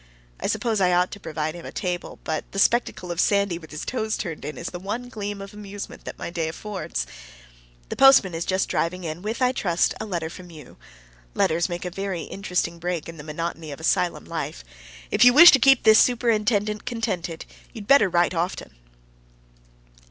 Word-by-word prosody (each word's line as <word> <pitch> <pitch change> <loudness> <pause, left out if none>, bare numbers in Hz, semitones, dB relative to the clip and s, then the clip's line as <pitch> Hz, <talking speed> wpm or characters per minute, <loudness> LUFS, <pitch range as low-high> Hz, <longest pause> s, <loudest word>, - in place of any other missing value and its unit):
I - - -2
suppose 225 -4 0
I 180 -1 +3
ought 180 +1 +2
to 205 - -8
provide 155 -3 -3
a 170 - -8
table, 180 -3 -4
but 155 -1 -4
the - - -6
spectacle 195 -4 +1
of 170 - -4
Sandy 200 -4 +1
with 160 - -14
his 155 - -6
toes 220 -3 -2
turned 165 -6 -5
in 150 - -6
is 170 - -5
the 175 - -6
one 220 +6 -5
gleam 205 -3 -5
of 195 - -11
amusement 205 -1 -9
that - - -7
my - - -6
day 165 -2 -2
affords. 185 - -4 0.8
The - - -4
postman 270 -9 +6
is 165 +1 -2
just 190 +2 0
driving 180 +2 -1
in 160 +1 -5
with, 220 +5 -2
I 250 - +4
trust, 175 -9 +1
a 220 - -5
letter 170 -4 -3
from 180 0 -11
you. 155 -3 -13 0.6
Letters 165 +3 +1
make 175 +1 -5
a 180 - -4
very 190 -3 -4
interesting 180 -3 -3
break 175 -2 -3
in 165 0 -9
the 150 - -9
monotony 160 0 -5
of 140 - -8
asylum 170 +2 0
life. 160 -2 -5 0.5
If - - +4
you 245 0 +8
wish 340 +6 +11
to 270 - +5
keep 270 +1 +5
this 220 0 +7
superintendent 215 -3 +1
contented, 205 -9 -3 0.3
you'd 220 -4 -9
better 275 -5 +5
write 175 +1 +2
often. 175 +2 -3
180 Hz, 195 wpm, -24 LUFS, 170-215 Hz, 0.8 s, wish